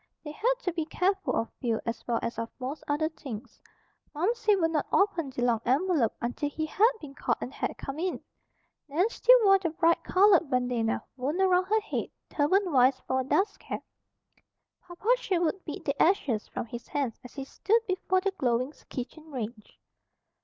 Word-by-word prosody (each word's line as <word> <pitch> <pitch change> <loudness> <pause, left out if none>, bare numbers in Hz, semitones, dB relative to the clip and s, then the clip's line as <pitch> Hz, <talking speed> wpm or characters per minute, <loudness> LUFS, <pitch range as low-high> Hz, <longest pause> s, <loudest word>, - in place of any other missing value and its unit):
They 300 - -6
had - - +1
to 360 - -1
be 325 -1 -1
careful 380 +4 0
of 225 - -1
fuel 230 -4 0
as 230 -1 -3
well 235 -1 +1
as 235 - -3
of 230 0 -3
most 270 +4 -5
other 295 +2 +1
things. 260 -9 -9 0.5
Momsey 420 +6 +2
would 330 -4 +1
not 300 -3 0
open 355 -7 +2
the 245 -2 -3
long 235 -2 +2
envelope 280 - +2
until 245 +5 -2
he 315 +2 -3
had 425 +9 +4
been 285 -3 -10
called - - -1
and 255 - -6
had - - -3
come 275 +3 -6
in. 365 +1 -1 0.7
Nan 325 +8 +2
still - - +6
wore 390 -1 +6
the 355 -3 -1
bright 335 +1 +2
colored 370 -5 +4
bandana 245 -3 0
wound 285 +8 -2
about 370 -1 +3
her 440 +1 +2
head, 425 - -3 0.2
turban 360 +6 +2
wise, 260 -1 +4
for 260 - 0
a - - 0
dust 380 +10 +1
cap. - - -6 1.0
Papa 355 +3 -11
Sherwood 360 -3 -1
beat 300 - -6
the 280 0 -1
ashes 280 - +2
from - - -4
his 235 +1 -8
hands 275 -6 -2
as 250 - -12
he 275 - -4
stood 450 +10 +1
before 370 -1 0
the 395 +1 0
glowing 255 -5 0 0.2
kitchen 305 +5 -7
range. 230 -4 -7
310 Hz, 185 wpm, -28 LUFS, 255-370 Hz, 1.0 s, still